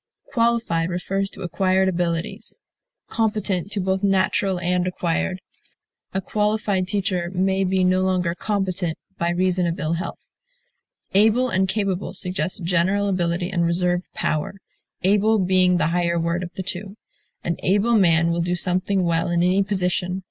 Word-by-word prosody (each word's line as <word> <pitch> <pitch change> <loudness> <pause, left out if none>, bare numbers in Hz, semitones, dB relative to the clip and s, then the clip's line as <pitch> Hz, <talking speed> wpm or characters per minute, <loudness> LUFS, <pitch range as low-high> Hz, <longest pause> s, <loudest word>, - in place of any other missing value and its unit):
Qualified 230 -8 +1
refers 195 +2 -2
to - - -10
acquired 190 +1 +1
abilities; 170 -2 -2 0.5
competent 210 -4 -1
to 205 - -1
both 190 0 0
natural 190 -1 +1
and 180 +1 0
acquired; 180 +1 -1 0.7
a 190 - -1
qualified 210 -2 0
teacher 185 -3 -1
may 190 +1 +1
be 190 0 +1
no 185 0 +3
longer 185 -2 +1
competent, 185 -4 -2 0.2
by 170 - +1
reason 180 0 +1
of 170 - -3
ill 155 +2 -1
health. 170 +2 -5 0.9
Able 220 +6 +4
and 190 -3 +1
capable 195 -2 -2
suggest 180 +1 -1
general 185 +4 +1
ability 175 -1 -1
and 175 -3 +1
reserved 175 +1 0
power, 155 +5 -1 0.5
able 210 +3 +3
being 185 -1 +3
the 165 - +1
higher 170 -1 +1
word 170 +1 -1
of 175 -1 -6
the 190 - -4
two. 195 +3 -6 0.5
An 170 - -2
able 205 +5 +2
man 170 -5 +4
will 170 0 0
do 175 +1 0
something 185 +2 0
well 165 0 +1
in 175 0 +2
any 185 +2 +3
position. 185 -2 -1
185 Hz, 150 wpm, -22 LUFS, 175-195 Hz, 0.9 s, Able